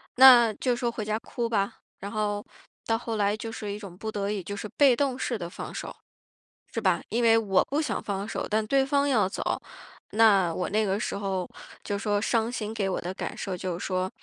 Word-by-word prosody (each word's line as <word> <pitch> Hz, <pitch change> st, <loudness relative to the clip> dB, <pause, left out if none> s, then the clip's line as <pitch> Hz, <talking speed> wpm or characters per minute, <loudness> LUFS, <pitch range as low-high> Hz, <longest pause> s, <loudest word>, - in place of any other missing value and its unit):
那 245 Hz, -3 st, +9 dB
就 250 Hz, -2 st, 0 dB
说 240 Hz, 0 st, -1 dB
回 225 Hz, -, -4 dB
家 215 Hz, +1 st, -1 dB
哭 235 Hz, 0 st, -3 dB
吧， 200 Hz, -3 st, 0 dB, 0.2 s
然 200 Hz, -, -6 dB
后 205 Hz, -1 st, -1 dB, 0.4 s
到 225 Hz, -, +1 dB
后 225 Hz, -1 st, -4 dB
来 205 Hz, 0 st, +2 dB
就 225 Hz, +1 st, -6 dB
是 210 Hz, -2 st, -5 dB
一 200 Hz, -, -4 dB
种 195 Hz, -4 st, -10 dB
不 220 Hz, -, -5 dB
得 200 Hz, -1 st, -2 dB
已 205 Hz, -2 st, -2 dB
就 200 Hz, +4 st, -5 dB
是 205 Hz, -, -5 dB
被 275 Hz, -4 st, +6 dB
动 270 Hz, -1 st, 0 dB
式 240 Hz, -, -1 dB
的 170 Hz, -4 st, -5 dB
放 -, -, -7 dB
手， -, -, -5 dB, 0.8 s
是 -, -, -1 dB
吧？ -, -, +2 dB
因 235 Hz, -, 0 dB
为 225 Hz, -1 st, +6 dB
我 200 Hz, -4 st, +3 dB
不 290 Hz, +3 st, 0 dB
想 310 Hz, -, -2 dB
放 200 Hz, 0 st, -3 dB
手， -, -, -3 dB
但 215 Hz, +1 st, +1 dB
对 270 Hz, +3 st, +3 dB
方 280 Hz, +1 st, +2 dB
要 220 Hz, -8 st, +3 dB
走， 195 Hz, -, -2 dB, 0.5 s
那 200 Hz, -6 st, +5 dB
我 180 Hz, -, -2 dB
那 215 Hz, +2 st, +1 dB
个 195 Hz, 0 st, 0 dB
时 -, -, -2 dB
候 190 Hz, -2 st, -2 dB, 0.3 s
就 205 Hz, -, -2 dB
说 205 Hz, 0 st, 0 dB
伤 225 Hz, 0 st, +1 dB
心 220 Hz, -3 st, -4 dB
给 200 Hz, -3 st, -1 dB
我 185 Hz, -, -1 dB
的 180 Hz, +2 st, -4 dB
感 -, -, -5 dB
受 190 Hz, -2 st, -4 dB
就 180 Hz, -1 st, -3 dB
是 -, -, -5 dB
说 185 Hz, 0 st, -1 dB
215 Hz, 250 characters per minute, -27 LUFS, 195-230 Hz, 0.8 s, 那